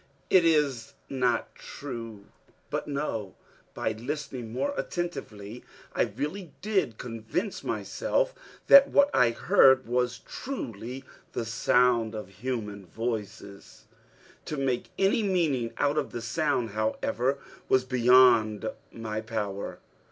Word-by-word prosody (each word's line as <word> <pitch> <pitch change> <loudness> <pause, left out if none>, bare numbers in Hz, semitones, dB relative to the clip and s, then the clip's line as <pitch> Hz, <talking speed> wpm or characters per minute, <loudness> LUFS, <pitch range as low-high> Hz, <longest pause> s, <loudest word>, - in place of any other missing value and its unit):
it 185 -2 +7
is 140 -5 +1 0.2
not 125 -3 0
true!" 115 -7 -8 0.5
But - - -2
no! 140 -9 -3 0.4
By - - -1
listening 125 0 -5
more 280 - -1
attentively, 125 - -5 0.3
I 115 - +1
really 155 - -4
did 195 - 0
convince 120 - -4
myself - - -1 0.3
that 280 0 +9
what 285 0 +4
I 125 -2 +5
heard 130 - +5
was 125 +1 0
truly 125 - -6 0.3
the 115 - -2
sound 115 0 +2
of 105 -3 -6
human 105 -7 -4
voices. 105 -1 -6 0.6
To 150 - -4
make 130 -3 -1
any 195 +3 +3
meaning 160 - +1
out 145 +2 +2
of 145 - -4
the 120 - -5
sound, 125 -3 0
however, 115 +5 0 0.3
was 130 -1 +4
beyond 120 -4 +5 0.2
my 110 -1 -4
power. 105 -3 -4
125 Hz, 115 wpm, -28 LUFS, 110-145 Hz, 0.6 s, that